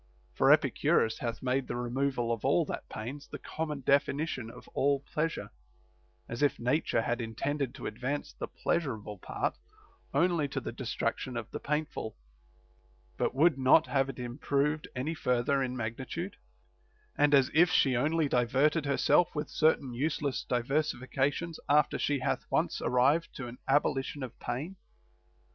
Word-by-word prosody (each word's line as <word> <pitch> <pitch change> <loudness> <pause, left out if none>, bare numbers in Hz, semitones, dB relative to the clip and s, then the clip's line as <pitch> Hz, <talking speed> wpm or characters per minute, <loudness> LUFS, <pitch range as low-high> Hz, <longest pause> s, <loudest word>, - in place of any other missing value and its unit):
For - - +4
Epicurus 110 - +3
hath 115 0 -4
made 130 +1 0
the - - -3
removal 120 0 -1
of 115 - -5
all - - +3
that - - -6
pains 130 +7 -6
the - - -7
common 150 -3 -4
definition 140 -2 +1
of - - -13
all 140 0 +1
pleasure; 155 +3 -3 0.8
as 115 - -5
if 145 - +3
Nature 125 -1 +1
had 120 +1 -1
intended 135 +4 -2
to - - -8
advance 130 +6 -3
the - - -5
pleasurable 110 - -2
part - - -3 0.5
only 165 0 +2
to 135 0 -3
the 115 - -5
destruction 125 0 -3
of 115 -1 -6
the - - -4
painful, 150 -6 -3 1.0
but - - -1
would 150 0 +4
not 130 0 +6
have 135 -1 +1
it 135 - -6
improved 140 +4 -1
any 135 +6 -2
further 135 -1 +1
in 130 -1 -2
magnitude, 130 - -4 0.8
arM 145 0 +5
as 135 -2 +4
if 175 +3 +6
she 135 -6 +3
only 155 +5 +2
diverted 140 +5 +2
herself 150 +5 +3
with 150 - -3
certain 150 -5 +2
useless 140 +1 -1
di 125 -1 +2
versifications 145 +3 -1
after 150 0 +3
she 145 - +1
hath 130 - -2
once - - 0
arrived 140 +7 +3
to 135 - -5
an 120 +2 -10
abolition 135 0 +1
of 125 - -8
pain. 145 +11 -4
135 Hz, 155 wpm, -30 LUFS, 125-150 Hz, 1.0 s, not